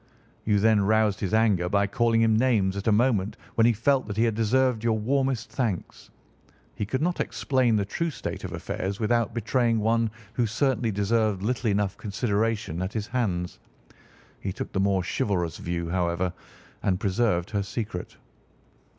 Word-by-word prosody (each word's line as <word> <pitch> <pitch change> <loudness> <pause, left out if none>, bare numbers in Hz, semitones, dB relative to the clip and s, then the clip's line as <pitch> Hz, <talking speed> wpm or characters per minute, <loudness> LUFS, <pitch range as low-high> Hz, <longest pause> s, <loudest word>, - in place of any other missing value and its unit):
"You 105 -1 +3
then 110 0 +4
roused 105 -1 +2
his 95 - -2
anger 105 -5 +2
by 100 +1 +2
calling 115 +1 +2
him 110 -1 +3
names 110 -6 +2
at 100 +2 -4
a - - +5
moment 105 -2 +2 0.2
when 115 0 +4
he 120 - +4
felt 135 +4 +1
that 105 -1 -5
he 115 - +3
had 115 -1 +2
deserved 115 +1 +1
your 115 -1 +2
warmest 130 +2 0
thanks. 115 -9 -3 0.6
He 105 - -4
could 130 +6 -1
not 175 +1 0
explain 130 -4 +1
the 100 -2 +1
true 165 - -2
state 150 - -6
of - - -5
affairs 95 +1 -4
without 115 +1 +1
betraying 115 0 +1
one 115 +1 +2 0.2
who 120 -1 +1
certainly 125 0 0
deserved 105 -1 +1
little 120 +1 0
enough 100 -1 0
consideration 105 -3 -1
at 95 +2 -3
his 110 -2 -2
hands. 95 -8 -2 0.8
He 95 - -3
took 90 - -6
the 95 - -1
more 95 -1 +2
chivalrous 85 -2 -1
view, 85 -1 -3
however, 90 0 0 0.5
and 90 -2 0
preserved 95 -2 0
her 100 -2 0
secret." 100 -2 -5
110 Hz, 170 wpm, -26 LUFS, 100-115 Hz, 0.8 s, a